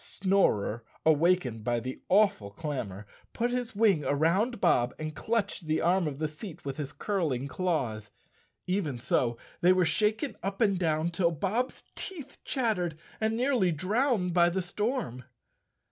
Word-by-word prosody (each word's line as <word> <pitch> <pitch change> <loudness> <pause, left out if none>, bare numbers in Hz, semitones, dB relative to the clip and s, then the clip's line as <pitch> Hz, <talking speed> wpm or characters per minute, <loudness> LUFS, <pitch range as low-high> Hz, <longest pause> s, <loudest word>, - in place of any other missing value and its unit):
Snorer, 150 - +1 0.2
awakened 155 -7 +3
by 120 +1 +1
the 130 +3 -6
awful 195 - +3
clamor, 105 - -5 0.3
put 240 +1 0
his 245 -3 -3
wing 200 -8 +3
around 185 - +1
Bob 125 -10 +2
and 155 -1 -5
clutched 220 -7 -1
the 155 0 +1
arm 175 0 +2
of 140 -2 -4
the 155 +1 -1
seat 165 +2 -10
with 135 -1 -4
his 145 -3 -4
curling 155 -11 -1
claws. 135 - -2 0.6
Even 180 -8 -1
so 120 0 +1 0.2
they 180 - +5
were 185 -1 +4
shaken 215 - +1
up 195 +1 -3
and 200 -5 +3
down 160 -1 +1
till 170 0 +2
Bob's 200 - -2
teeth 305 -8 -7
chattered 205 - 0 0.2
and 220 +1 0
nearly 245 -8 +2
drowned 195 - +1
by 175 0 +5
the 185 +1 -1
storm. 205 - -2
175 Hz, 150 wpm, -29 LUFS, 145-210 Hz, 0.6 s, they